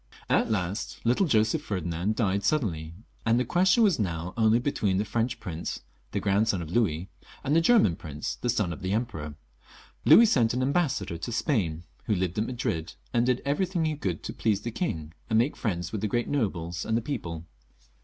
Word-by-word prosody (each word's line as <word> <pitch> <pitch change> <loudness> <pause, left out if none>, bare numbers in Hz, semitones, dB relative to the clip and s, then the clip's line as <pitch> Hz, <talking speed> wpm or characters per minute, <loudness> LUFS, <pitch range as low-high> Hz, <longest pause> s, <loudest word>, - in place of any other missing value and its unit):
At - - +3
last 100 -1 -2
little 125 +11 +2
Joseph 110 -5 +2
Ferdinand 90 +1 -2
died 100 -3 0
suddenly, 85 - -1 0.3
and 115 +1 +3
the 125 - 0
question 185 - +4
was 195 - +3
now 85 -2 -2
only 110 0 +4
between 110 -7 0
the 105 - 0
French 115 +4 -1
prince, 85 -2 -5 0.3
the - - -1
grandson 100 0 +2
of 80 -2 -6
Louis, 95 -5 0 0.3
and 145 - +1
tiie 165 - +5
German 165 - +4
prince, 75 -3 -5
the 120 - -1
son 105 -7 +1
of 90 - -10
the 95 +1 -1
Emperor. 100 -11 -3 0.7
Louis 235 - +8
sent 120 - +3
an 130 - 0
ambassador 130 - 0
to 85 - -4
Spain, 100 - 0 0.2
who 105 - +1
lived 90 +1 -1
at 110 - 0
Madrid, 90 -10 -3 0.2
and 120 0 +2
did 125 -1 +1
everything 170 +4 0
he 155 -1 0
could 95 - -3
to - - -5
please 105 -3 0
the 120 - -4
king 80 - -3 0.2
and 110 - +3
make 120 +6 +2
friends 90 -5 -2
with 110 - -3
the 110 - 0
great 120 +3 0
nobles 90 - -2
and 110 - 0
£he - - 0
people. 85 - -4
110 Hz, 195 wpm, -27 LUFS, 90-125 Hz, 0.7 s, Louis